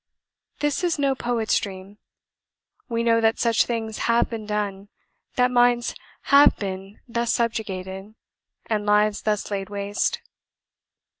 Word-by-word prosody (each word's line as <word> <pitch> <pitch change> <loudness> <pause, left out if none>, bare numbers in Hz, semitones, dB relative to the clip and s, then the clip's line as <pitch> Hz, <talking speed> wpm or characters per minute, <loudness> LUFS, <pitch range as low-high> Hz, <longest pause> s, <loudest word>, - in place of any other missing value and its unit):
This 295 +3 0
is 345 -3 +1
no 280 -1 +2
poet's 240 -3 0
dream: 195 +1 -8 0.9
we 230 -1 -1
know 230 -1 +3
that 225 0 +3
such 230 -1 +2
things 225 -2 -3
HAVE 235 +1 +3
been 220 -2 -5
done; 205 -1 -3 0.5
that 250 0 +3
minds 245 -1 +3 0.3
HAVE 280 +1 +6
been 195 0 -6
thus 235 -1 -1
subjugated, 195 -3 -3 0.5
and 210 -2 -1
lives 210 0 +3
thus 210 -1 -1
laid 195 -1 -3
waste. 205 0 -1
220 Hz, 130 wpm, -24 LUFS, 205-235 Hz, 0.9 s, HAVE